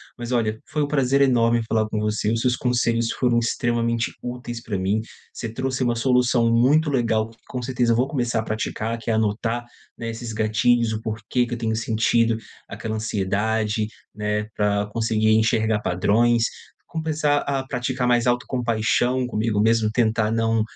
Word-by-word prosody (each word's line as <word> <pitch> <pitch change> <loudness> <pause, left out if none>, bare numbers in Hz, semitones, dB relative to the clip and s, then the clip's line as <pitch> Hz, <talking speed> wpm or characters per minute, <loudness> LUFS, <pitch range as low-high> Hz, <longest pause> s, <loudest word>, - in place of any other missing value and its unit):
Mas, 120 0 -6
olha, 110 -2 0
foi 150 -1 0
um - - -1
prazer 140 -1 +2
enorme 120 -3 +3
falar 110 -1 +1
com 105 - -2
você. 105 0 0
Os 115 0 0
seus 125 -1 +2
conselhos 115 -2 +1
foram 120 -2 +2
extremamente 115 0 0
úteis 120 -1 -6
pra 105 -4 -3
mim. 95 +4 0 0.3
Você 115 - -5
trouxe 130 +2 -2
uma 120 -1 +1
solução 125 -1 +2
muito 145 +6 +3
legal, 115 -3 +1 0.2
com 125 -2 -4
certeza 120 -2 +1
vou 125 +3 +2
começar 120 -5 -1
a 110 - -1
praticar, 110 +1 -3
que 115 - -6
é - - +2
anotar, 110 +2 0 0.3
né, 115 0 -4
esses 115 0 -6
gatilhos, 110 +2 +2
o 110 - -4
porquê 115 +2 -1
que - - -5
eu 120 - -2
tenho 110 -1 -1
sentido 115 +1 +2 0.3
aquela 110 0 -5
ansiedade, 110 +1 -1 0.3
né, 105 0 -2
pra 105 -1 +1
conseguir 110 0 0
enxergar 110 0 +2
padrões. 115 +6 +2 0.4
Começar 155 -2 0
a 135 -2 -2
praticar 125 0 -2
mais 120 0 +3
autocompaixão 120 0 +1
comigo 110 -3 -1
mesmo. 115 -1 +3
Tentar 115 -2 +1
não 115 -1 +1
115 Hz, 165 wpm, -23 LUFS, 110-125 Hz, 0.4 s, enorme